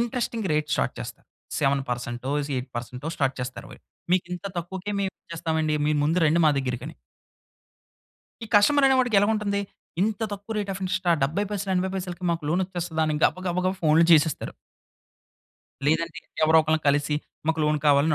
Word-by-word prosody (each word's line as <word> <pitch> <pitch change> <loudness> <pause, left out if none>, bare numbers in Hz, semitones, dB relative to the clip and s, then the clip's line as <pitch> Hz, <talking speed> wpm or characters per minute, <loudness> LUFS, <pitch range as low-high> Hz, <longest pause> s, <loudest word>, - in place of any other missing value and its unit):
Interesting 235 -3 -2
rate 150 0 0
start - - 0
చేస్తారు. - - -8 0.3
7%టో 125 -2 -1 0.2
జ్ - - -8
8%టో 125 +2 -5
start 135 -2 +1
చేస్తారు 125 +1 -6
వాళ్ళు. - - -14 0.3
"మీకింత 180 0 -1
తక్కువకే 190 +4 -5
మేము 195 -1 -1 0.2
చేస్తామండి 160 -2 0
మీరు 150 0 +2
ముందు 165 +4 +2
రండి 160 +3 +3
మా - - +6
దగ్గరకి" 125 -1 -3
అని. 160 - -10 1.5
ఈ - - -8
కస్టమర్ 275 +7 +6
అనేవాడికి 255 -4 +3
ఎలాగుంటుంది? 205 -1 +1 0.4
"ఇంత 215 0 0
తక్కువ 205 +2 -6
రేట్ 205 -1 -2
అఫ్ 195 - -7
ఇంట్రెస్టా? 185 -1 +1
70 160 +10 +1
పైసలు 200 -1 -2
80 185 +1 0
పైసలకి 180 -1 -5
మాకు 165 -1 -3
లోనొచ్చేస్తదా!" 175 -2 -1
అని 155 - 0
గబ - - +3
గబ 175 - -2
గబ 185 - +2
ఫోన్‌లు 160 +1 +5
చేసేస్తారు. 155 -2 +3 1.3
లేదంటే 165 +2 +1 0.3
ఎవరో 160 +1 +5
ఒకల్ని 155 +1 +1
కలిసి 145 +1 +2 0.3
మాకు 160 0 +1
లోన్ 150 0 +2
కావాలని 145 +2 +4
165 Hz, 160 wpm, -25 LUFS, 150-195 Hz, 1.5 s, మా